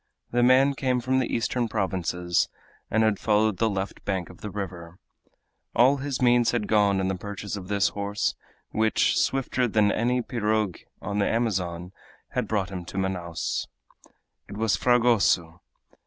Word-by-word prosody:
The 120 Hz, -, +2 dB
man 130 Hz, +3 st, +5 dB
came 130 Hz, -2 st, 0 dB
from 130 Hz, +2 st, +1 dB
the 130 Hz, -, -1 dB
eastern 120 Hz, +1 st, 0 dB
provinces, 90 Hz, -4 st, -1 dB, 0.4 s
and 110 Hz, +1 st, +2 dB
had 110 Hz, -2 st, +2 dB
followed 105 Hz, -2 st, +2 dB
the 115 Hz, -, +2 dB
left 100 Hz, -1 st, -4 dB
bank 95 Hz, -4 st, -2 dB
of 90 Hz, -, -17 dB
the 105 Hz, -, -5 dB
river. 90 Hz, -4 st, -7 dB, 0.8 s
All 130 Hz, +4 st, +5 dB
his 140 Hz, -1 st, -3 dB
means 120 Hz, -1 st, +4 dB
had 115 Hz, -4 st, -1 dB
gone 100 Hz, -2 st, +3 dB
in 95 Hz, -, 0 dB
the 95 Hz, -, 0 dB
purchase 100 Hz, +2 st, -6 dB
of 95 Hz, -3 st, -7 dB
this 100 Hz, -1 st, +2 dB
horse, 100 Hz, 0 st, -2 dB, 0.4 s
which, 110 Hz, 0 st, +2 dB
swifter 135 Hz, -1 st, 0 dB
far 125 Hz, -, +4 dB
than 105 Hz, -2 st, +3 dB
any 125 Hz, +3 st, 0 dB
pirogue 110 Hz, -6 st, -1 dB, 0.3 s
on 105 Hz, 0 st, -2 dB
the 100 Hz, -, +2 dB
Amazon, 90 Hz, -6 st, -1 dB, 0.4 s
had -, -, -2 dB
brought 100 Hz, -3 st, -1 dB
him 90 Hz, -2 st, -5 dB
to 90 Hz, -, -8 dB
Manaos. 90 Hz, -3 st, -2 dB, 0.8 s
It 100 Hz, -, -7 dB
was 110 Hz, -1 st, +2 dB
Fragoso! 115 Hz, -9 st, +2 dB
105 Hz, 165 wpm, -26 LUFS, 95-120 Hz, 0.8 s, man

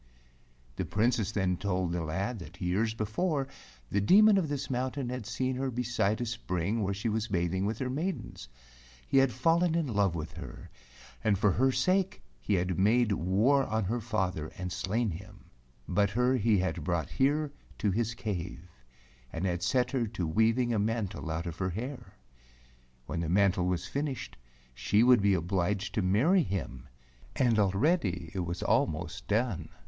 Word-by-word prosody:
The -, -, -1 dB
Princess 110 Hz, -1 st, +1 dB
then 95 Hz, -4 st, 0 dB
told 90 Hz, -2 st, -1 dB
the 85 Hz, 0 st, -1 dB
lad 95 Hz, +9 st, -2 dB
that 85 Hz, +2 st, -11 dB
years 105 Hz, +5 st, 0 dB
be¬ 110 Hz, -2 st, -2 dB
fore 145 Hz, -, -1 dB, 0.4 s
the 100 Hz, -, +2 dB
Demon 210 Hz, -, +6 dB
of 160 Hz, -5 st, -2 dB
this 145 Hz, -2 st, -3 dB
mountain 130 Hz, 0 st, -2 dB
had 125 Hz, -4 st, -5 dB
seen 130 Hz, +3 st, -1 dB
her 135 Hz, 0 st, -1 dB
beside 120 Hz, -3 st, 0 dB
a -, -, 0 dB
spring 110 Hz, -2 st, -2 dB
where 100 Hz, -1 st, 0 dB
she 105 Hz, +4 st, -3 dB
was 110 Hz, 0 st, -1 dB
bathing 95 Hz, 0 st, 0 dB
with 110 Hz, +1 st, -2 dB
her 130 Hz, -, -2 dB
maidens. 165 Hz, -, -4 dB, 0.6 s
He 135 Hz, -, +4 dB
had 135 Hz, -1 st, +4 dB
fallen 165 Hz, +5 st, +2 dB
in 165 Hz, -2 st, +1 dB
love 100 Hz, -, +1 dB
with 80 Hz, -1 st, -5 dB
her, -, -, -9 dB, 0.5 s
and 105 Hz, -3 st, +3 dB
for 105 Hz, +1 st, +3 dB
her 130 Hz, +7 st, +3 dB
sake 185 Hz, +9 st, +1 dB, 0.2 s
he 105 Hz, -, 0 dB
had 90 Hz, 0 st, -1 dB
made 110 Hz, +3 st, +3 dB
war 105 Hz, +10 st, +3 dB
on 110 Hz, 0 st, -1 dB
her 115 Hz, +5 st, -1 dB
father 95 Hz, -8 st, -1 dB
and 90 Hz, -1 st, -4 dB
slain 100 Hz, +4 st, -1 dB
him, 95 Hz, +3 st, -11 dB, 0.4 s
but 100 Hz, +2 st, +2 dB
her 125 Hz, +5 st, +2 dB
he 110 Hz, -3 st, +3 dB
had 90 Hz, -3 st, -1 dB
brought 85 Hz, -1 st, -1 dB
here 145 Hz, +2 st, +1 dB, 0.2 s
to 105 Hz, -, +1 dB
his 115 Hz, +3 st, -1 dB
cave, 90 Hz, -5 st, -5 dB, 0.6 s
and 80 Hz, +3 st, -3 dB
had 90 Hz, -2 st, -1 dB
set 125 Hz, +8 st, +1 dB
her 125 Hz, -4 st, 0 dB
to 105 Hz, -5 st, -3 dB
weaving 115 Hz, +8 st, +2 dB
a 110 Hz, -, +1 dB
mantle 105 Hz, -5 st, -2 dB
out 80 Hz, +1 st, -2 dB
of 85 Hz, -1 st, -5 dB
her 95 Hz, -1 st, 0 dB
hair. 125 Hz, +9 st, -6 dB, 0.9 s
When 85 Hz, -, -4 dB
the 85 Hz, -1 st, -2 dB
mantle 95 Hz, 0 st, +3 dB
was 90 Hz, -1 st, -1 dB
finished 140 Hz, +4 st, -4 dB, 0.4 s
she 100 Hz, -, +2 dB
would 125 Hz, -3 st, +6 dB
be 100 Hz, -1 st, +4 dB
obliged 95 Hz, +3 st, -1 dB
to 110 Hz, -, +1 dB
marry 120 Hz, -, +3 dB
him, 80 Hz, -, -4 dB, 0.5 s
and 120 Hz, -4 st, +3 dB
already 95 Hz, -, +1 dB
it 95 Hz, -, -3 dB
was 85 Hz, 0 st, -3 dB
almost -, -, 0 dB
done. 110 Hz, -3 st, 0 dB
105 Hz, 175 wpm, -30 LUFS, 90-125 Hz, 0.9 s, Demon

